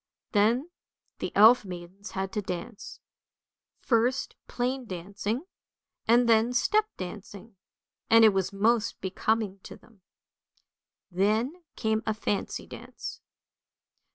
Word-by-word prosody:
Then 235 +10 +2 0.5
the - - -3
elf 220 +4 +7
maidens 185 +2 -9
had 190 0 -2
to 210 - -2
dance, 185 +2 -7 0.8
first 245 +2 +1
plain 255 +1 -2
dancing, 200 - -4 0.6
and 235 +2 +5
then 230 +1 +4
step 425 - +3
dancing, 200 +3 -8 0.5
and 225 0 +7
it - - +9
was 190 0 0
most 220 +3 +1
becoming 200 +1 -1
to - - -11
them. 220 -4 -23 1.1
Then 215 - +1 0.2
came 220 0 0
a 220 - 0
fancy 205 -2 -3
dance. - - -9
220 Hz, 110 wpm, -28 LUFS, 195-235 Hz, 1.1 s, it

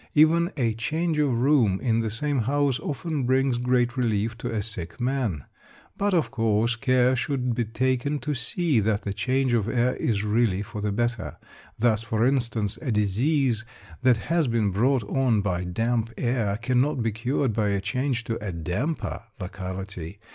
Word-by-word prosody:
Even 165 +4 +5
a 115 -4 +1
change 155 +8 -1
of 145 -3 +2
room 120 -8 +3
in 115 -3 +1
the 115 -1 -1
same 140 +5 -1
house 140 +2 +1
often 150 +1 -3
brings 130 -1 +2
great 125 0 +1
relief 115 -3 0
to - - -3
a 110 -2 -1
sick 95 -4 -5
man. 120 - -1 0.5
But, 200 -1 +1
of 165 - +1
course, 115 -1 +1
care 130 +1 +3
should 125 -1 -1
be 120 0 -1
taken 130 +5 0
to 150 - -2
see 140 +2 0
that 105 0 0
the 100 - -3
change 130 +3 0
of 115 -3 +1
air 125 +1 +1
is 105 -3 0
really 105 -2 +1
for 105 -1 -7
the 105 0 -1
better. 120 +2 -2 0.4
Thus, 110 -2 +2
for 115 0 0
instance, 115 -6 0
a 135 - -2
disease 115 +4 +1 0.4
that 125 -2 +4
has 165 +5 0
been 115 -4 +1
brought 120 +5 +2
on 115 0 +1
by 90 -3 -1
damp 115 +5 -1
air 115 -5 0
cannot 125 +3 +1
be 115 - +1
cured 120 +3 -1
by 105 -1 +1
a 100 -1 +1
change 120 +5 -1
to 115 -2 -4
a 100 - -3
damper 90 - -3 0.2
locality. 95 -1 -6
120 Hz, 175 wpm, -25 LUFS, 105-135 Hz, 0.5 s, Even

